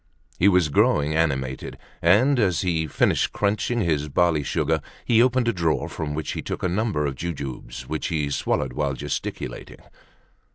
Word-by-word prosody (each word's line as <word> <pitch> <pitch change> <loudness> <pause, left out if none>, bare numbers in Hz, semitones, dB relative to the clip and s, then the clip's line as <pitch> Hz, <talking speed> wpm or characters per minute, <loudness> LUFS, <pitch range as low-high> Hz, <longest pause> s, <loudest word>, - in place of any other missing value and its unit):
He 95 - +5
was 90 -5 +4
growing 75 +1 +2
animated, 65 -5 -1 0.2
and 120 +11 +4
as 95 -7 +2
he 85 -3 0
had 80 -3 -5
finished - - +2
crunching 105 +3 0
his 75 -5 0
barley 85 0 +2
sugar, 70 - 0 0.2
he 115 -1 +4
opened 125 -1 +2
a 115 - +2
drawer 85 -4 0
from 75 -2 -4
which 80 0 -3
he - - -4
took - - -5
a - - +2
number 95 -4 0
of 70 - -1
jujubes, 70 -5 -6
which 80 - -2
he 75 -4 -1
swallowed 65 -2 -1
while 70 0 -1
gesticulating. - - -5
80 Hz, 170 wpm, -24 LUFS, 75-100 Hz, 0.2 s, He